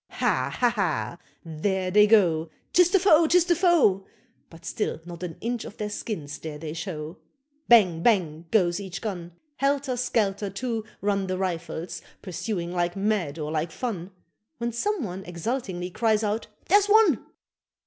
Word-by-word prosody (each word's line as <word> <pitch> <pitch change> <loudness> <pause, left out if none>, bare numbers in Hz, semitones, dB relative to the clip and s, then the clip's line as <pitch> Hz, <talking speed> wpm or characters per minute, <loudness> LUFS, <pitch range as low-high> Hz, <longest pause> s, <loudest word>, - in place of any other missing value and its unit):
Ha, - - 0
ha, 245 - +4
ha! 170 - -1 0.3
there 185 +4 -1
they 210 +2 +6
go 170 -7 +4 0.2
'Tis 360 -1 +6
the 390 - +4
foe; 335 -4 +5
'tis 350 +1 +4
the 345 -1 +3
foe 325 - +3 0.4
But 165 -1 -15
still - - -2
not 175 -1 -9
an 175 -3 -5
inch 235 +1 -2
of - - -10
their 210 -1 -3
skins 160 -10 -5
dare 155 -2 -6
they 155 0 -6
show. 160 -2 -6 0.5
Bang, 185 -9 +5
bang! 170 -7 +1
goes 180 -4 +2
each 195 -1 -6
gun: 175 -6 -5 0.2
Helter 275 -1 0
skelter, 210 -5 0
too, 225 +2 -3 0.2
run 200 -1 0
The 185 0 -2
Rifles, 175 -2 -4 0.2
pursuing 180 -2 -3
like 175 -1 -1
mad 195 -7 -1
or 150 -1 -4
like 160 +1 -1
fun 195 -7 -4 0.5
When 235 0 -2
some 395 - -1
one 190 -2 -5
exultingly 180 0 -4
cries 220 +2 +1
out 215 +2 -1 0.2
"Here's 405 +2 +5
one!" 415 - +5
195 Hz, 160 wpm, -26 LUFS, 170-235 Hz, 0.5 s, they